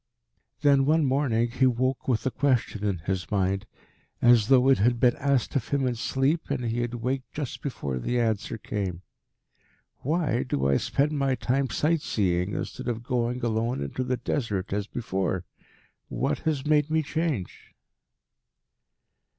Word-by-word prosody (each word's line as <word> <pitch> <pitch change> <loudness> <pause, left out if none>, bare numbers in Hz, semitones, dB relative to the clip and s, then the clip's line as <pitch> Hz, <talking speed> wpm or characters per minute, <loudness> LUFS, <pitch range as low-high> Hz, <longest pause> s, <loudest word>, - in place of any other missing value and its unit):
Then 140 -2 +5
one 155 0 +4
morning 125 -4 +1
he 130 +1 +3
woke 130 +1 0
with 120 -4 +1
a 130 - +1
question 125 -6 0
in 100 -3 0
his 95 -1 -2
mind, 100 -1 0 0.5
as 120 -3 +5
though 130 0 +5
it 135 -4 +5
had 120 +3 +2
been 125 -1 +4
asked 140 -1 0
of 130 -5 0
him 140 -2 0
in 125 - +1
sleep 135 +7 0
and 125 - -1
he 115 +1 -1
had 120 0 -3
waked 130 +2 -3
just 145 -4 -5
before 70 - -3
the 120 - -1
answer 115 -1 -1
came. 95 -5 -4 0.9
"Why 150 -4 0
do 70 - -1
I 70 -1 +3
spend 145 +2 0
my 135 -3 +1
time 135 +1 0
sight 160 +1 +1
seeing, 90 -4 0
instead - - -5
of 120 -1 -2
going 125 0 -1
alone 115 +2 0
into 70 - -3
the 125 0 -1
Desert 110 -6 -2
as 100 0 -1
before? 95 -6 -2 0.6
What - - -1
has 140 -4 -2
made 150 0 +3
me 160 0 +2
change?" 150 - -3
125 Hz, 160 wpm, -26 LUFS, 105-135 Hz, 0.9 s, Then